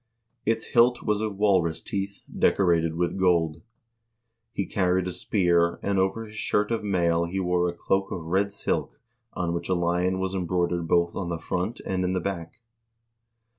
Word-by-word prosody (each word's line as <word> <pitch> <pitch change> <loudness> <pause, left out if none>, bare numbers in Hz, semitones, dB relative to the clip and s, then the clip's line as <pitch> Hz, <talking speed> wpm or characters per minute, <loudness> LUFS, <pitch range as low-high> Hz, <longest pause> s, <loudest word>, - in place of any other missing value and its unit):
Its 115 0 +1
hilt 120 +1 +4
was 105 -1 0
of 105 -3 -3
walrus 90 -6 +2
teeth, 100 +3 -4
decorated 85 -4 +2
with 85 +2 -1
gold. 85 -4 +2 0.9
He 100 - -2
carried 90 -1 +1
a - - -2
spear, 85 -3 +1
and 100 -1 +1
over 95 +4 0
his 105 0 -13
shirt 105 0 0
of 115 -2 -1
mail 85 -4 +1
he 90 +3 -3
wore 90 -1 +1
a - - -4
cloak 95 +2 0
of 85 - -4
red 95 +4 +1
silk 100 - -2 0.3
on 85 -1 -2
which 85 - -4
a 95 - +3
lion 90 +2 +1
was 95 0 -2
embroidered 90 -2 0
both 85 +1 +2
on 90 -3 -3
the 85 - -2
front 90 +7 -3
and 95 -1 -2
in 90 0 0
the 95 - +1
back." 85 +2 -5
90 Hz, 175 wpm, -26 LUFS, 85-100 Hz, 0.9 s, hilt